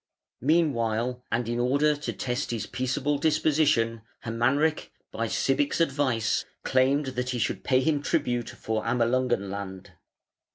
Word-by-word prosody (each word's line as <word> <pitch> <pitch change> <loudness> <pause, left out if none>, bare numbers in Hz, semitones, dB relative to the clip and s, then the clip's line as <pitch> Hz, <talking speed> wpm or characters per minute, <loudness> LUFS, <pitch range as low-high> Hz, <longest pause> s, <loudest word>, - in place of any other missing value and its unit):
Meanwhile, 125 -5 +1
and 120 -1 0
in 120 +1 -1
order 140 +5 +3
to 145 - -4
test 125 +2 -3
his 115 -2 -2
peaceable 135 +3 -1
disposition, 145 -7 +2 0.2
Hermanric, 130 +7 +1 0.2
by - - -2
Sibich's 290 - +1
advice, 135 -8 +1 0.2
claimed 135 +3 +2
that 125 0 -2
he 125 - -1
should 115 - -1
pay 130 -1 +3
him 145 +1 +1
tribute 120 -4 -1
for 110 -1 -3
Amalungen 120 -3 +1
land. 95 -2 -7
125 Hz, 130 wpm, -27 LUFS, 115-145 Hz, 0.2 s, order